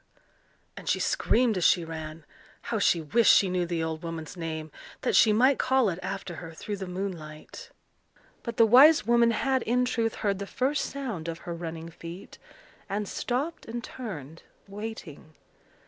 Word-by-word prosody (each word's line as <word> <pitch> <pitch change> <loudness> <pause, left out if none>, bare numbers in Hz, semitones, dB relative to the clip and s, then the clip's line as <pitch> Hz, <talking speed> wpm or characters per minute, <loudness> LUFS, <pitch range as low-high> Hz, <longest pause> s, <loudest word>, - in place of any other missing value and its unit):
and - - -6
she - - +2
screamed 235 -3 +2
as 180 - -1
she 170 0 +4
ran. 160 -1 -7 0.4
How 225 - -2
she 175 -4 +3
wished 220 +9 +4
she 190 -2 +4
knew 180 -1 0
the 170 -1 -1
old 160 -1 -3
woman's 165 -1 -6
name, 160 -2 -5 0.3
that - - 0
she 220 - +6
might 255 +6 +4
call 260 -4 +3
it 175 -1 -4
after 185 -2 -5
her 165 -1 -8
through 205 +5 -5
the 190 -1 -6
moonlight! 180 -5 -7 0.7
But 235 -2 -6
the 230 - +7
wise 265 +5 +7
woman 235 0 +4
had, 260 +3 +1
in 250 +2 +1
truth, 230 -3 -1
heard 200 -2 -1
the 200 - -5
first 270 +7 0
sound 235 - -5
of 165 -1 -4
her 175 - -4
running 165 -1 -6
feet, 170 +2 -10 0.5
and 205 +1 -2
stopped 275 - -3
and 235 +1 -5
turned, 165 - -8 0.3
waiting. 195 -7 -8
195 Hz, 170 wpm, -27 LUFS, 165-235 Hz, 0.7 s, the